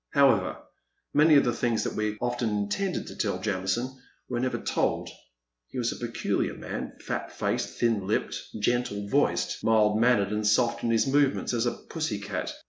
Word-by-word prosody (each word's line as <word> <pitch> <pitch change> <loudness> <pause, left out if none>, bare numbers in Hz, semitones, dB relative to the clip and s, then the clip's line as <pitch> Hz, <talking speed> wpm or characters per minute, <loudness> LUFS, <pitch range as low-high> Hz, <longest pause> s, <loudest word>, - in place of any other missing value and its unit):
However, 130 -10 +4 0.6
many 150 +1 +6
of 140 - +7
the 120 - +1
things 115 -1 0
that - - -2
we 105 0 -2
often 120 -1 -1
intended 105 - -1
to - - -9
tell 100 -4 -1
Jamison 105 +7 -2 0.3
were 120 -1 -2
never 130 +1 0
told. - - -1 0.6
He - - -9
was 120 -1 0
a - - -5
peculiar 115 - -1
man, - - -5
fat - - -3
faced, - - -2
thin 110 -5 +1
lipped, 105 - 0 0.2
gentle 105 -3 0
voiced, - - +1
mild 110 -1 +4
mannered, 115 -5 +3
and 105 0 0
soft 115 +2 +2
in 115 - +1
his 115 +2 +3
movements 140 -1 +2
as 120 0 +1
a 120 - 0
pussy 155 -11 -2
cat. 100 - -4
115 Hz, 175 wpm, -27 LUFS, 105-125 Hz, 0.6 s, of